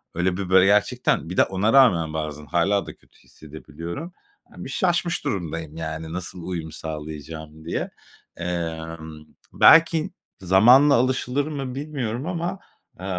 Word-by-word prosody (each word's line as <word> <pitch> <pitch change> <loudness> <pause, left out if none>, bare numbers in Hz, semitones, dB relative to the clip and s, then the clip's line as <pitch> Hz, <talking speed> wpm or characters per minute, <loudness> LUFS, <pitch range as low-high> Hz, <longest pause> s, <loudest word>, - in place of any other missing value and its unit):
Öyle 90 +1 0
bir 95 -2 -4
böyle, 95 0 +6
gerçekten 100 -4 +1
bir 90 - -6
de - - +7
ona 95 +4 0
rağmen 90 - +4
bazen 75 -1 -5
hâlâ 95 +5 +1
da - - -10
kötü - - -28
hissedebiliyorum. 85 - -9 0.4
Bir - - -7
şaşmış 175 -3 0
durumdayım, 80 -4 -4
yani, 80 0 -5
nasıl 90 -1 -5
uyum 85 -4 -5
sağlayacağım 80 0 -8
diye. 85 - -3 0.5
Emm, 80 -2 -5 0.3
belki 165 -1 +5 0.3
zamanla 120 +10 +6
alışılır 130 +3 0
mı 135 -4 -5
bilmiyorum 135 -4 -4
ama, 175 +1 -3 0.4
eee, 95 - -8
90 Hz, 130 wpm, -23 LUFS, 80-130 Hz, 0.5 s, de